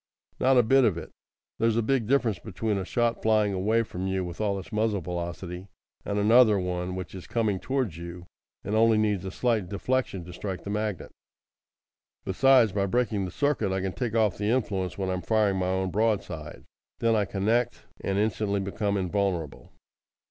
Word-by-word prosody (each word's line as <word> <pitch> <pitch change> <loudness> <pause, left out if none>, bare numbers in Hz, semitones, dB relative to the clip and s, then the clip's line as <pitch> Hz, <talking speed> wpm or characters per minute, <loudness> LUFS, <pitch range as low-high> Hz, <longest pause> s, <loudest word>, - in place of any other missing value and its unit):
"Not 130 0 +4
a 125 - +6
bit 135 +4 +4
of 100 -8 +2
it! 85 - -7 0.5
There's 115 0 +2
a 115 - +2
big 125 -2 +1
difference 120 -7 +2
between 105 0 -2
a 95 - -4
shot 120 +3 0
flying 110 -2 +2
away 110 +5 +2
from 95 -3 -5
you 95 -1 -1
with 85 +4 -6
all 100 -2 0
its 95 - -9
muzzle 105 -2 0
velocity, 90 +2 -5 0.4
and 100 - -2
another 110 +1 +6
one 90 0 -2
which 90 -4 -6
is 90 -3 -9
coming 110 -5 0
towards 130 - -2
you 85 +1 -8 0.4
and 100 - -3
only 110 0 +4
needs 105 -3 +1
a - - -3
slight 110 -2 0
deflection 100 -3 -1
to 90 - -10
strike 95 0 -5
the 100 - -5
magnet. 105 -2 -3 1.1
Besides, 125 +3 +5
by 100 0 0
breaking 110 -2 0
the 90 - -6
circuit 140 - 0
I 95 - 0
can 95 -1 -2
take 120 -3 -3
off 110 -4 +2
the 105 0 0
influence 100 -7 -1
when 95 -1 -1
I - - 0
am 90 - -3
firing 105 -3 +2
my 90 -1 0
own 95 0 -1
broadside. 95 -7 -2 0.3
Then 115 -1 +2
I 105 -2 +2
connect, 105 +5 0 0.2
and 95 0 -1
instantly 105 -1 0
become 100 +1 -1
invulnerable." 90 -5 -2
100 Hz, 190 wpm, -27 LUFS, 95-115 Hz, 1.1 s, a